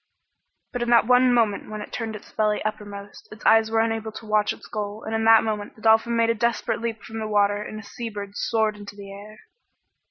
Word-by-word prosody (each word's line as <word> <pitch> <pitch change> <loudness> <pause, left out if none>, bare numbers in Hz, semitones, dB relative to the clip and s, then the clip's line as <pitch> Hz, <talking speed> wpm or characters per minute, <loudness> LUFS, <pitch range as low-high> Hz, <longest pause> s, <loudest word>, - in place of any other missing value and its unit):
But 245 - -4
in 240 - -1
that 235 -2 +5
one 250 +1 +5
moment 225 -4 +1
when 215 0 -6
it 210 - -9
turned 220 -2 -4 0.2
belly 210 -1 +1
uppermost, 205 -1 -6
its 215 - -12
eyes 220 0 +5
were 225 0 +2
unable 225 -1 -2
to 220 +1 -9
watch 215 -1 +2
its - - -9
goal, 210 0 -5
and 220 - -5
in 225 0 0
that 225 0 +7
moment 210 -2 -3
the 215 - -18
dolphin 225 +1 +4
made 230 0 +3
a - - +2
desperate 235 +1 -1
leap 230 -2 -4
from 225 +2 -7
the 215 - -3
water 205 -1 +2
and 215 0 -7
a - - -10
sea 230 +3 -6
bird 205 -2 -7
soared 220 -1 0
into 205 0 -10
the 200 -1 -10
air. 205 +2 -11
220 Hz, 230 wpm, -24 LUFS, 210-225 Hz, 0.2 s, that